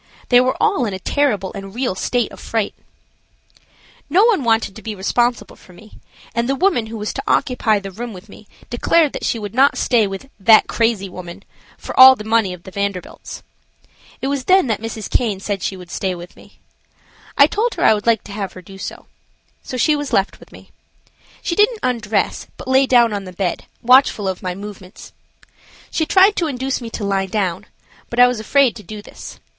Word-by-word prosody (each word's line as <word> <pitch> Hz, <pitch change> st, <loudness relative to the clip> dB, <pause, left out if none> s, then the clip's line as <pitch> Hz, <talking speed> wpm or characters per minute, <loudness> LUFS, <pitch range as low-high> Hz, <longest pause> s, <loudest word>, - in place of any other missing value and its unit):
They 245 Hz, 0 st, +6 dB
were 255 Hz, +1 st, 0 dB
all 400 Hz, -, +2 dB
in 200 Hz, -, -4 dB
a -, -, -7 dB
terrible 210 Hz, -6 st, 0 dB
and 195 Hz, +1 st, -9 dB
real 250 Hz, -4 st, -1 dB
state 240 Hz, +5 st, -1 dB
of -, -, -12 dB
fright. 225 Hz, -3 st, -2 dB, 1.4 s
No 370 Hz, +8 st, +4 dB
one 425 Hz, -, +2 dB
wanted 225 Hz, -4 st, +1 dB
to 220 Hz, -, -10 dB
be 220 Hz, -1 st, -5 dB
responsible 240 Hz, +5 st, -1 dB
for 180 Hz, -, -18 dB
me, 215 Hz, +5 st, -16 dB, 0.3 s
and 235 Hz, +2 st, -1 dB
the 275 Hz, -, +1 dB
woman 305 Hz, -, +1 dB
who 225 Hz, +1 st, -7 dB
was 210 Hz, 0 st, -4 dB
to 270 Hz, -, -5 dB
occupy 235 Hz, -4 st, +1 dB
the 195 Hz, -1 st, -8 dB
room 235 Hz, +5 st, -6 dB
with 190 Hz, 0 st, -12 dB
me 205 Hz, 0 st, -15 dB, 0.2 s
declared 300 Hz, +5 st, +2 dB
that -, -, -6 dB
she -, -, 0 dB
would 205 Hz, -2 st, -6 dB
not 270 Hz, +4 st, +3 dB
stay 230 Hz, -5 st, +2 dB
with 195 Hz, +6 st, -7 dB
that 215 Hz, +3 st, +6 dB
"crazy 225 Hz, -4 st, 0 dB
woman" 185 Hz, +1 st, -10 dB, 0.3 s
for -, -, -8 dB
all 260 Hz, 0 st, +11 dB
the 215 Hz, -, -8 dB
money 220 Hz, -3 st, +1 dB
of 180 Hz, -1 st, -9 dB
the 190 Hz, -, -11 dB
Vanderbilts. 200 Hz, -2 st, -5 dB, 0.8 s
It -, -, 0 dB
was 275 Hz, -2 st, -2 dB
then 375 Hz, -2 st, +4 dB
that 220 Hz, -4 st, -2 dB
Mrs. 225 Hz, -1 st, -5 dB
Caine 215 Hz, -6 st, 0 dB
said 195 Hz, -1 st, -3 dB
she 190 Hz, -, -3 dB
would 180 Hz, -1 st, -12 dB
stay 190 Hz, -2 st, -2 dB
with 175 Hz, 0 st, -11 dB
me. -, -, -19 dB, 0.8 s
I 280 Hz, -, +8 dB
told 435 Hz, +9 st, -1 dB
her -, -, -2 dB
I -, -, +6 dB
would 210 Hz, +1 st, -4 dB
like 225 Hz, -3 st, +3 dB
to -, -, -11 dB
have 200 Hz, -2 st, -5 dB
her 185 Hz, -, -11 dB
do 195 Hz, +2 st, -13 dB
so. -, -, -7 dB, 0.6 s
So 255 Hz, -, -6 dB
she 300 Hz, +5 st, +3 dB
was 290 Hz, -1 st, -4 dB
left 195 Hz, -, 0 dB
with -, -, -17 dB
me. -, -, -16 dB, 0.7 s
She -, -, -1 dB
didn't 425 Hz, +4 st, +3 dB
undress, 230 Hz, -5 st, -1 dB
but -, -, -10 dB
lay 265 Hz, +1 st, +3 dB
down 240 Hz, -4 st, +4 dB
on 200 Hz, -1 st, -4 dB
the 185 Hz, -, -8 dB
bed, 180 Hz, -1 st, -3 dB, 0.2 s
watchful 250 Hz, -4 st, +4 dB
of 185 Hz, -1 st, -3 dB
my 180 Hz, -1 st, -4 dB
movements. 200 Hz, -1 st, -11 dB, 0.8 s
She 315 Hz, -, -1 dB
tried 390 Hz, +2 st, +5 dB
to 335 Hz, -, +1 dB
induce 265 Hz, -1 st, -3 dB
me 235 Hz, -, -6 dB
to 225 Hz, -, -6 dB
lie 195 Hz, -1 st, 0 dB
down, 190 Hz, -4 st, -2 dB, 0.4 s
but 235 Hz, -, -3 dB
I 245 Hz, -, +9 dB
was 250 Hz, -2 st, 0 dB
afraid 260 Hz, +2 st, +2 dB
to -, -, -10 dB
do 210 Hz, +2 st, -9 dB
this. -, -, -11 dB
225 Hz, 210 wpm, -19 LUFS, 195-260 Hz, 1.4 s, all